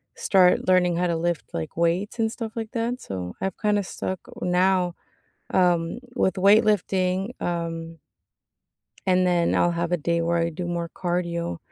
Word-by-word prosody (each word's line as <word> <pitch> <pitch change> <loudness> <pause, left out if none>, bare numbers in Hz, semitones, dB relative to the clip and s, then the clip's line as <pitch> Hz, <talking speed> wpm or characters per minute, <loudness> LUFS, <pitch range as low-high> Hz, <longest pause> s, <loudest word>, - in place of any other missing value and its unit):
start 185 -1 +3
learning 180 -2 +4
how 180 +1 +1
to 170 -1 0
lift, 170 0 -2
like, 80 -1 -4
weights 170 +6 0
and 225 -1 +1
stuff 225 -1 -6
like 225 -2 -4
that, 240 +1 -2
so, 90 -2 -6
I've 190 -1 -2
kinda 210 -2 +2
stuck 185 0 -4 0.2
now, 180 0 +2 0.6
um, 175 0 +2 0.2
with 190 - +2
weightlifting, 195 -1 +3
um 165 -1 -3 1.1
and 185 -1 +3
then 175 -1 +2
I'll 175 - +3
have 170 0 -2
a - - +4
day 170 +2 0
where 170 +1 +1
I 165 0 +1
do 170 +2 -5
more 170 -1 -2
cardio. 170 - -2
180 Hz, 160 wpm, -24 LUFS, 170-190 Hz, 1.1 s, learning